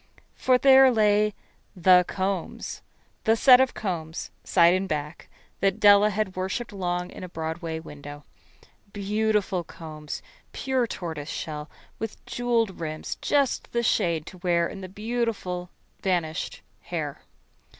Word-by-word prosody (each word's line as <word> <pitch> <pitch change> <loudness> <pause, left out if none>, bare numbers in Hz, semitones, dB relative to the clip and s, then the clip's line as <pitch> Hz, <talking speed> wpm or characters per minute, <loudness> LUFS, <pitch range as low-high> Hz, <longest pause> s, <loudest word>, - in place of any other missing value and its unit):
For 255 -1 +3
there 265 0 +7
lay 210 -2 +3 0.4
The 180 0 +6
Combs 190 -2 -3 0.4
the 225 - +5
set 250 +2 +7
of 265 - +1
combs, 165 -6 -4
side 170 -1 +5
and 190 +1 -1
back, 150 +1 -4 0.3
that 195 -1 +1
Della 205 0 +7
had 210 -2 -2
worshipped 190 +6 -3
for 200 - -10
long 180 -1 -2
in - - -9
a 180 - -7
Broadway 160 0 -4
window. 145 -2 -10 0.7
Beautiful 205 -2 0
combs, 155 -2 -8 0.3
pure 260 -3 0
tortoise 160 -7 -5
shell, 150 -2 -5 0.3
with 225 -1 -6
jewelled 230 -5 0
rims 155 -1 -4
just 280 -3 +1
the 235 0 +1
shade 170 -7 +1
to 185 - -11
wear 170 -2 +2
in 195 - -8
the 185 - -7
beautiful 210 -4 -3 0.3
vanished 170 -5 -1 0.2
hair. - - -4
185 Hz, 135 wpm, -26 LUFS, 170-220 Hz, 0.7 s, there